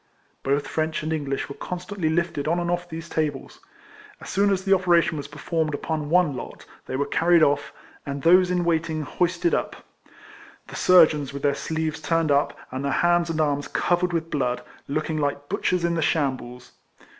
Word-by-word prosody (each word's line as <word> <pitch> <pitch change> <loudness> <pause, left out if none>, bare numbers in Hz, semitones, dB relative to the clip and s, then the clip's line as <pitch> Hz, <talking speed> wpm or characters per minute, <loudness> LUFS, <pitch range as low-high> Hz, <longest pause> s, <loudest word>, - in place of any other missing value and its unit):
Both 140 +1 0
French 160 0 -2
and 160 +1 -1
English 140 -3 -2
were 140 - -7
constantly 180 +1 -4
lifted 160 -3 -1
on 170 +2 +1
and 175 0 -1
off 175 0 -2
these 165 0 -7
tables. 150 -5 -3 0.6
As - - -8
soon 200 +1 +3
as 190 -1 0
the 195 - +4
operation 175 -3 +3
was 145 -2 -5
performed 155 +1 -2
upon 155 0 -3
one 170 -4 +3
lot, - - -8 0.2
they 130 - -4
were 140 +2 0
carried 170 +1 +3
off, 145 0 +1 0.3
and 140 -1 -5
those 180 +2 +6
in 180 -1 0
waiting 160 -2 0
hoisted 180 - 0
up: - - -1 0.9
the - - -9
surgeons 155 -6 +4
with 140 - -7
their 145 -1 +3
sleeves 160 +1 -3
turned 165 0 +1
up, 140 +1 +1
and 130 +2 -4
their 140 - 0
hands 175 +2 +2
and 160 -1 -2
arms 145 -2 0
covered 175 0 0
with 165 -1 -2
blood, 125 -4 -1 0.2
looking 155 +2 -2
like 145 0 -2
butchers 180 -3 0
in 170 - +1
the 165 - 0
shambles. 130 -5 -2
160 Hz, 185 wpm, -24 LUFS, 145-175 Hz, 0.9 s, those